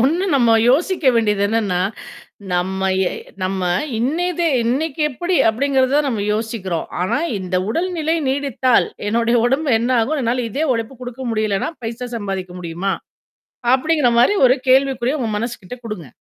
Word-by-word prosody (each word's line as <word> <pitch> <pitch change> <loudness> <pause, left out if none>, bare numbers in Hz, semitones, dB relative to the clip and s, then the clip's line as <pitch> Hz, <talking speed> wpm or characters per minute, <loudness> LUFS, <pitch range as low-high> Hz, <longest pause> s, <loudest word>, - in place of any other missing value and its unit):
ஒண்ணு 320 +10 +2
நம்ம 235 -4 +4
யோசிக்க 335 +5 +1
வேண்டியது 210 -3 +2
என்னன்னா. 205 -5 0 0.7
நம்ம 190 +2 0 0.2
எ - - -7 0.3
நம்ம 190 0 -2 0.4
இன்னய 325 +9 0
தே 340 - +3 0.2
இன்னைக்கி 280 +6 -1
எப்பிடி 350 +6 -1
அப்பிடிங்கிறத 265 +3 +2
நம்ம 220 -6 -2
யோசிக்கிறோம். 210 -6 -3 0.2
ஆனா, 210 +6 0 0.2
இந்த 185 -1 -2
உடல்நிலை 330 +3 -1
நீடித்தால் 265 -2 +1 0.2
என்னுடைய 235 +2 +2
உடம்பு 275 +4 +1
என்ன 235 +3 -1
ஆகும். 280 +8 0
அதனால 245 -1 0
இதே 290 +9 -1
உழைப்பு 230 +3 -4
கொடுக்க 250 +1 -7
முடியலன்னா, 215 0 0
பைசா 235 +2 -5
சம்பாதிக்க 195 -4 -4
முடியுமா? 175 +3 -2 0.8
அப்பிடிங்கிறமாரி 260 0 +3
ஒரு 255 +2 +3
கேள்விக்குறிய 265 +1 +3
உங்க 230 - -1
மனசுகிட்ட 235 -1 -5
குடுங்க. 210 -9 -6
240 Hz, 135 wpm, -19 LUFS, 210-275 Hz, 0.8 s, நம்ம